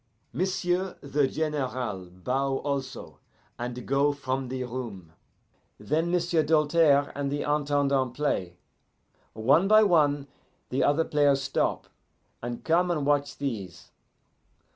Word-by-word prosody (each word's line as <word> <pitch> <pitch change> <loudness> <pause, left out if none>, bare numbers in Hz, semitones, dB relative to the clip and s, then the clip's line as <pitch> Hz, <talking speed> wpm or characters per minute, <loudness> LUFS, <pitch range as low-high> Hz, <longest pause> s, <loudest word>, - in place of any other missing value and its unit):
M'sieu' 185 0 -1
the 140 0 +1
General 130 - -3
bow 130 +9 -1
also, 135 -2 -5 0.4
and 120 0 -5
go 140 +2 +2
from 135 -2 -3
the 130 0 -3
room. 115 -10 -7 0.7
Then 155 +11 0
M'sieu' 175 -2 +2
Doltaire 150 -1 +3
and 140 -1 -3
the 145 - -2
Intendant 140 -3 +1
play. 90 -12 -2 0.8
One 140 - +3
by 215 +1 +7
one 145 -7 +3 0.4
the 130 - 0
other 150 +3 +2
players 145 -2 +2
stop, - - -1 0.6
and 120 0 -5
come 175 +2 +2
and 155 -5 0
watch 145 0 +1
these. 100 -11 -5
140 Hz, 120 wpm, -27 LUFS, 130-150 Hz, 0.8 s, by